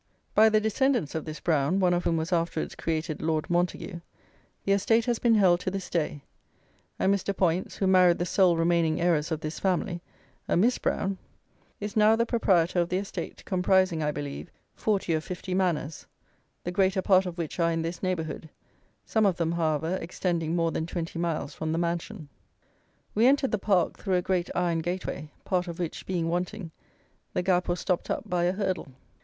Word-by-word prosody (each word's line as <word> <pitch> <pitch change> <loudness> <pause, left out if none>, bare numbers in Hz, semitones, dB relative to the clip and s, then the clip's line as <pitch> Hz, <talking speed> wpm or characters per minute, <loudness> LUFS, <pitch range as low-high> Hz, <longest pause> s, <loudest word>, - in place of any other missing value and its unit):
By 220 +1 +6
the 215 0 +4
descendants 220 - +1
of 160 - -3
this 155 0 -6
Brown, 160 +2 +1
one 180 -2 +3
of 175 0 -1
whom 165 - +2
was 160 +3 -2
afterwards 165 -2 -1
created 160 -1 -3
Lord 155 -1 0
Montague, 175 +1 -1 0.7
the 195 - +1
estate 225 +4 +3
has 240 -2 0
been 235 -2 +4
held 185 -4 +5
to 185 - -2
this 195 0 -5
day; 150 -4 -1 0.7
and 195 - +3
Mr. 200 0 -2
Poyntz, 180 0 0
who 195 - -1
married 185 -2 +5
the 175 - -1
sole 180 -1 +3
remaining 165 -1 +2
heiress 165 -3 +2
of 160 -2 -2
this 155 0 -5
family, 185 -1 -1 0.5
a - - +2
Miss 235 +8 +3
Brown, 195 0 -1 0.6
is 205 0 -5
now 215 +1 +5
the 230 +1 +1
proprietor 185 -7 +2
of 170 0 +1
the 180 - 0
estate, 190 -3 -6
comprising, 185 -2 +2
I 150 0 +1
believe, 145 +3 -6 0.2
forty 200 -5 0
or 155 - +1
fifty 180 +2 -5
manors, 170 -5 -1 0.6
the 175 - -3
greater 190 0 +2
part 190 -2 +4
of 175 -1 -6
which 170 0 -4
are 170 0 +3
in 165 0 -1
this 170 +2 -4
neighbourhood, 160 -4 -3 0.6
some 220 -2 +2
of 185 - 0
them, 165 -2 0
however, 165 +1 0
extending 170 -1 -2
more 165 -1 +1
than 160 - -2
twenty 170 -1 -4
miles 170 -4 -2
from 155 0 -3
the - - 0
mansion. 170 +1 -3 0.9
We 225 +4 +4
entered 275 0 +3
the 215 - 0
park 190 -3 +1
through 190 -3 0
a 180 - +1
great 180 -2 0
iron 175 -2 +1
gateway, 165 -3 -4 0.2
part 180 -2 0
of 170 -1 -6
which 175 -3 -5
being 175 -3 -1
wanting, 180 +1 -3 0.6
the - - +1
gap 180 -1 +2
was 175 0 -1
stopped 180 -3 -1
up - - -2
by 175 -1 +1
a 175 - +3
hurdle. 190 -4 -2
175 Hz, 195 wpm, -27 LUFS, 165-190 Hz, 0.9 s, By